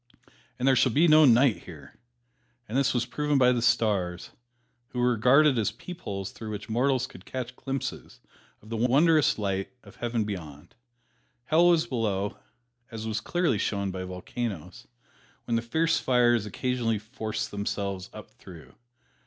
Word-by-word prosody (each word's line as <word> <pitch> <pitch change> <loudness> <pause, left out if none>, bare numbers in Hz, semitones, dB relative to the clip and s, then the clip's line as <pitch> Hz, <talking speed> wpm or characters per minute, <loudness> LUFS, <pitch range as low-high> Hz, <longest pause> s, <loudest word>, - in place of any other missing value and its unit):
"And 130 - -1
there 135 - +5
shall 130 0 +3
be 160 +9 +4
no 155 0 +7
night 125 -1 +4
there," - - -12 0.7
and 110 - -6
this 135 -1 +3
was 120 -1 0
proven 145 +3 0
by 125 -1 +5
the 120 -1 0
stars, 100 -7 0 0.6
which - - -23
were 125 0 +2
regarded 125 +4 +4
as 110 - +1
peepholes 105 - -7
through 110 - -8
which 105 -1 -6
mortals 130 +3 +1
could 90 -8 -13
catch 130 +1 -6
glimpses 135 0 -5 0.4
of 110 - -15
the 115 - -3
wondrous 145 +6 +3
light 95 -2 -2
of - - -16
Heaven 120 -2 -1
beyond. 85 -6 -7 0.7
Hell 160 +6 +4
was 170 -2 +4
below, 105 -5 -2 0.5
as 110 -1 -7
was 110 0 -2
clearly 170 - 0
shown 100 -1 -1
by 95 0 -5
volcanoes, 95 0 -6 0.6
when 115 - -1
the 115 - +1
fierce 160 +8 +1
fires 120 -4 +2
occasionally 120 +1 -1
forced 110 0 -5
themselves 100 -2 -3
up 110 -1 -11
through. 85 -5 -14
115 Hz, 155 wpm, -27 LUFS, 100-130 Hz, 0.7 s, no